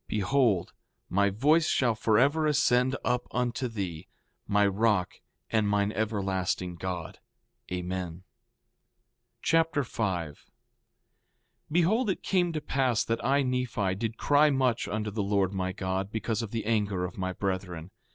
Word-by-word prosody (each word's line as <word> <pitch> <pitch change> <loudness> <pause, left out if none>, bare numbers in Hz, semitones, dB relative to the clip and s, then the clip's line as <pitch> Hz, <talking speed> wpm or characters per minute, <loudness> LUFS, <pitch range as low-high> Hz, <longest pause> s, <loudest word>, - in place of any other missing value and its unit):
Behold, 105 -3 +1 0.4
my 100 +2 +3
voice 150 +11 +3
shall 120 -3 +2
forever 135 +9 +2
ascend 130 -3 +3
up 125 0 0
unto 125 +1 -1
thee, 95 -8 -5 0.4
my 105 0 +3
rock 100 -2 +1 0.3
and 110 -2 +2
mine 100 0 +1
everlasting 95 -4 -1
God. 90 -1 -5 0.5
Amen. 90 0 -2
2 80 - -9
Nephi 90 +3 -15 1.2
Chapter 165 -3 +2
5 90 - -3
5:1 - - -26 1.3
Behold, 195 +9 +2
it 190 - -2
came 180 -3 +1
to 155 - -2
pass 130 -5 +1
that 115 0 -2
I, 140 +1 +3
Nephi, 125 -7 -1
did 110 +3 -3
cry 145 +1 +4
much 130 -4 +1
unto 105 0 -2
the 105 +1 -2
Lord 100 -1 +1
my 95 -1 -1
God, 95 +1 -3
because 110 +1 -2
of 115 - -4
the 115 0 -3
anger 105 -5 0
of 90 - -8
my 95 0 -1
brethren. 90 -2 -4
110 Hz, 145 wpm, -28 LUFS, 95-125 Hz, 1.3 s, cry